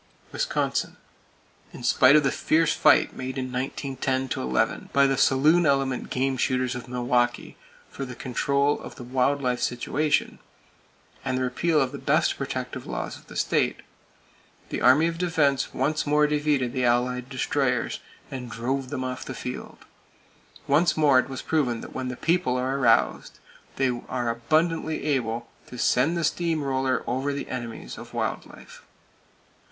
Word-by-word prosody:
Wisconsin: - - -1 0.8
In - - -10
spite 130 +3 +5
of 150 - +5
the 135 - +2
fierce 165 +1 +2
fight - - +4
made 130 +1 -5
in 130 -1 -3
1910 130 0 -2
11 65 0 -1
by 140 0 +4
the 135 0 +2
saloon 150 +7 +4
element 135 -2 0
game 130 +1 0
shooters 130 0 0
of 125 0 -7
Milwaukee 120 0 0 0.3
for 140 - -7
the 125 -2 -7
control 140 +3 0
of - - -10
the 125 - -9
wild 130 +3 0
life 125 -1 0
situation, 145 +5 0 0.8
and 130 - -1
the 130 - 0
repeal 155 +5 +1
of 130 -3 +1
the 140 - -7
best - - +2
protective - - -5
laws - - -4
of - - -16
the - - -12
state, - - 0 0.9
the - - -3
Army 145 +6 +6
of 165 0 -2
Defense 155 -7 +1
once 150 +4 -1
more 150 +1 +4
defeated 145 -4 0
the 130 -2 -1
Allied 125 +1 +1
Destroyers, 130 -1 -1 0.3
and 125 -3 -6
drove 130 +3 -2
them 130 - -3
off 130 0 -4
the 130 - -7
field. 125 - -7 0.8
Once 175 +1 +3
more 145 -4 +5
it 130 +1 -1
was 130 - -6
proven 130 -8 0
that - - -10
when 130 -1 -4
The 125 -1 -5
People 165 -7 +1
are 130 +2 -1
aroused, 115 -3 +2 0.4
they 135 -1 +1 0.2
are 120 -2 -1
abundantly 155 +7 0
able 120 -5 -1 0.2
to 125 - -10
send 140 +8 +2
the 170 - -1
steam 160 0 0
roller 130 -2 0
over 130 +4 -1
the 140 0 -5
enemies 120 -3 -6
of - - -11
wild - - -2
life. - - -14
130 Hz, 160 wpm, -25 LUFS, 125-145 Hz, 0.9 s, Army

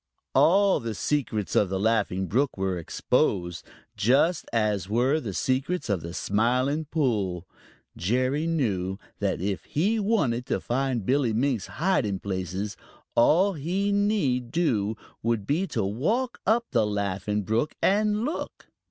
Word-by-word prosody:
All 195 +3 +4
the 115 -2 -4
secrets 115 -9 -1
of 100 - +3
the 95 0 -1
Laughing 100 -3 +1
Brook 130 - 0
were 95 -2 -1
exposed, 85 +1 0 0.3
just 135 - +2
as 105 -5 0
were 125 +8 +2
the 115 -9 -5
secrets 135 - -1
of 95 -4 0
the 85 +1 -7
Smiling 125 +8 +1
Pool. 105 - -1 0.5
Jerry 130 - 0
knew 100 - -1 0.2
that 100 -2 0
if 100 0 -2
he 205 +9 +1
wanted 150 - 0
to - - 0
find 125 -3 -1
Billy 130 -2 +2
Mink's 120 -3 0
hiding 140 - 0
places, 95 +1 -3 0.4
all 180 +11 +4
he 185 +6 -1
need 200 - +1
do 110 -10 0 0.2
would 115 -3 0
be 165 - 0
to 110 - -1
walk 210 - -1
up 235 +2 +3
the 115 -5 +2
Laughing 100 0 -1
Brook 115 +9 -1
and 210 +3 +2
look. 305 - -5
120 Hz, 140 wpm, -26 LUFS, 100-160 Hz, 0.5 s, All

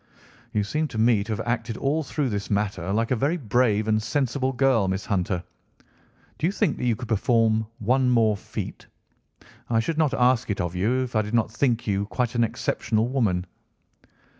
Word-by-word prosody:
"You 105 - 0
seem 155 +9 -1
to 115 - -8
me 110 -2 +3
to 110 - -5
have 110 +1 -3
acted 115 -1 -2
all 145 +4 0
through 145 -2 -2
this 100 -2 -3
matter 100 -3 -1
like 115 +4 0
a - - +4
very 140 +9 0
brave 110 - +1
and 110 0 +2
sensible 130 +3 0
girl, 130 -6 +2
Miss 95 +1 -2
Hunter. 90 -3 -1 1.0
Do 160 - +1
you - - +1
think 200 -6 0
that - - -3
you 120 -2 +2
could 120 - -7
perform 110 0 +2
one 125 +4 +2
more 115 -3 +3
feat? - - -7 0.8
I 115 -1 +2
should 155 +8 -1
not 150 -4 +2
ask 125 -2 +2
it 100 - -1
of 85 -1 -2
you 115 +8 +1
if 125 -2 -7
I 110 - +4
did 105 +2 -3
not 115 -1 +1
think 120 0 0
you 100 -2 0
a - - -2
quite 125 +1 -1
exceptional 115 -1 0
woman." 105 -9 0
115 Hz, 195 wpm, -25 LUFS, 105-130 Hz, 1.0 s, a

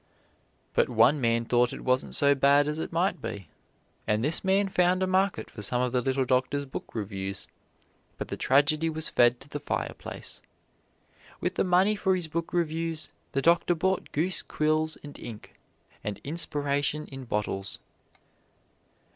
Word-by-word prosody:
But - - +2
one 145 +2 +4
man 115 -1 +2
thought 120 +1 +2
it - - -8
wasn't 130 +1 +1
so 140 0 +5
bad 140 +1 +4
as 150 +1 -2
it - - -4
might 180 +5 0
be, 100 -7 -6 0.6
and 105 +1 +1
this 150 +5 +1
man 195 +1 +3
found 185 0 +2
a - - +3
market 185 - 0
for - - -8
some 125 +5 0
of 125 0 0
the 125 0 +1
little 130 +1 0
doctor's 130 +3 +1
book 130 - -8
reviews, 100 -2 -4 0.7
but - - -5
the - - -3
tragedy 150 +4 +3
was 160 0 -1
fed 120 0 +4
to 135 - -10
the 145 0 -5
fireplace. 145 - -4 1.0
With - - -1
the - - +1
money 185 +3 +3
for 190 -2 +1
his 175 -3 -2
book 165 +1 -3
reviews 165 -1 0 0.2
the 135 - 0
doctor 170 +1 +4
bought 190 +3 -1
goose 175 +5 +1
quills 155 +1 0
and 145 -1 -10
ink, 110 -3 -9 0.5
and 105 -1 -4
inspiration 145 -1 -1
in 135 -1 -7
bottles. 105 -3 -2
145 Hz, 165 wpm, -28 LUFS, 125-170 Hz, 1.0 s, so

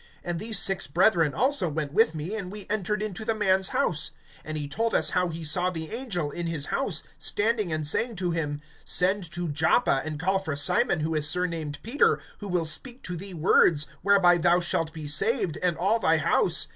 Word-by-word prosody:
And 175 -1 -3
these 220 +2 0
six 195 -2 +1
brethren 165 -2 +2
also 255 - +2
went 150 -1 -4
with 215 -6 +3
me, 155 +6 -5
and 190 -4 -5
we 205 -1 -7
entered 210 0 -1
into 215 0 -5
the 225 0 -1
man's 190 -3 +2
house. 150 -3 0 0.3
(13)And 155 - -6
he 150 -2 -3
told 230 +10 -1
us - - +4
how 180 -1 +1
he 165 -1 -6
saw 180 +4 +1
the 160 -3 -6
angel 200 - -3
in 170 +2 -4
his 160 -4 0
house, 200 - -1 0.2
standing 215 -3 +1
and 155 -1 -2
saying 230 +10 +1
to 180 -2 -2
him: 150 -3 -3 0.2
Send 185 -1 +1
to 175 0 -3
Joppa, 155 - +2
and 155 -2 -5
call 190 +3 +1
for 160 -6 -4
Simon 175 - +2
who 160 +1 -1
is 150 -1 +2
surnamed 165 -4 -2
Peter; 230 - +2 0.2
(14)who 205 - -6
will 175 -2 0
speak 245 - -4
to 180 - -5
thee 190 +2 -7
words, 155 -2 +4 0.2
whereby 185 -3 +4
thou 175 +1 +3
shalt 165 -2 -1
be 160 -2 -8
saved, 170 - +1
and 175 -3 0
all 200 +7 +1
thy 165 -6 +3
house. 155 - +1
175 Hz, 210 wpm, -26 LUFS, 155-205 Hz, 0.3 s, us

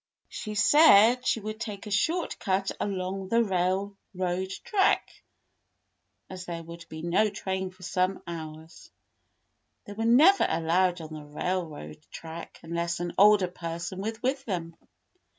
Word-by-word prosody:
She 215 -1 -6
said 235 -2 +6 0.2
they 225 - -7
would 215 +1 -6
take 210 -3 -6
a 210 - -7
short 325 - 0
cut 195 0 0
along 190 -1 -3
the 230 +4 +3
railroad 190 -1 -2
track, 400 -2 +2 1.2
as 185 -1 -8
there 170 -2 -6
would 170 +1 -11
be 160 0 -8
no 175 +5 +2
train 190 -1 -3
for 185 0 -17
some 185 +2 0
hours. 160 -1 -9 1.0
They 205 - -8
were 225 +2 -3
never 305 +13 +6
allowed 175 +2 +1
on 155 0 -9
the 155 - -7
railroad 150 - -4
track 165 +1 -9
unless 170 +1 -2
an 175 0 -3
older 205 -2 +6
person 175 +2 -6
was 220 +2 -4
with 265 +2 0
them. 170 -5 -4
185 Hz, 140 wpm, -27 LUFS, 170-210 Hz, 1.2 s, said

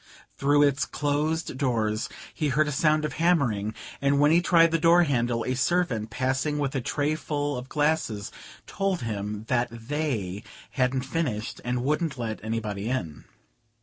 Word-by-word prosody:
Through 145 +1 +3
its 140 -1 +2
closed 150 0 -1
doors 110 -5 0 0.2
he 150 - -1
heard 150 +4 +2
a - - -1
sound 155 +1 +2
of - - -3
hammering, 120 - +2 0.3
and 140 0 +3
when 145 +1 +5
he 170 +2 +5
tried 165 -2 +5
the 165 - +2
door 170 +2 +6
handle 120 -6 0
a 130 - 0
servant 130 -5 0
passing 130 +5 -1
with 140 -2 -1
a 135 - -1
tray 145 +5 0
full 145 -2 -2
of 125 +1 -6
glasses 145 -9 0 0.3
told 195 -3 -1
him 105 -1 -4
that 125 -1 +1
"they" 115 - -3 0.3
hadn't 130 -1 0
finished, 130 -7 -3
and 125 0 -1
wouldn't 150 +1 0
let 110 -3 -4
anybody 110 -1 -3
in. 85 - -3
135 Hz, 160 wpm, -26 LUFS, 115-150 Hz, 0.3 s, door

